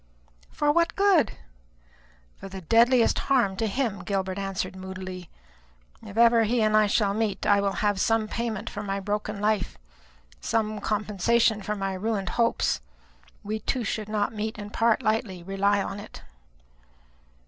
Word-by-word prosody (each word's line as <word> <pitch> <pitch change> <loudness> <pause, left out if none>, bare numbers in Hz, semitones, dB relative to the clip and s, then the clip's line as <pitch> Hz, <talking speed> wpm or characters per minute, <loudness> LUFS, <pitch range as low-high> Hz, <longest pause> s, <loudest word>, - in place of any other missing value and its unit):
"For 295 0 +1
what 335 +2 +1
good?" 390 -6 +3 1.1
"For 195 - -8
the 190 0 -8
deadliest 230 +6 +4
harm 240 -8 +3
to 225 - 0
him," 220 -3 -2
Gilbert 190 -1 -2
answered 195 -1 -3
moodily. 185 -1 -7 0.7
"If 205 0 -10
ever 235 0 +6
he 225 +1 +1
and 215 0 +2
I 215 -1 +4 0.2
meet, 210 -2 -2
I 200 -1 +4
will 200 -1 0
have 205 -2 +1
some 225 -1 +2
payment 225 -1 -3
for 205 - -5
my 200 -1 -3
broken 210 +1 -3
life; 210 -2 0 0.6
some 215 - -1
compensation 215 +2 +1
for 210 +2 -3
my 195 -1 -2
ruined 195 -1 -2
hopes. 230 - +1 0.6
We 215 +2 -3
two 245 +3 -2
should 215 0 -3
not 210 0 -1
meet 215 0 -4
and 205 0 -8
part 230 -1 +2
lightly, 215 -5 -1
rely 195 +2 +1
upon 200 0 -3
it." 215 - -11
210 Hz, 150 wpm, -26 LUFS, 195-225 Hz, 1.1 s, ever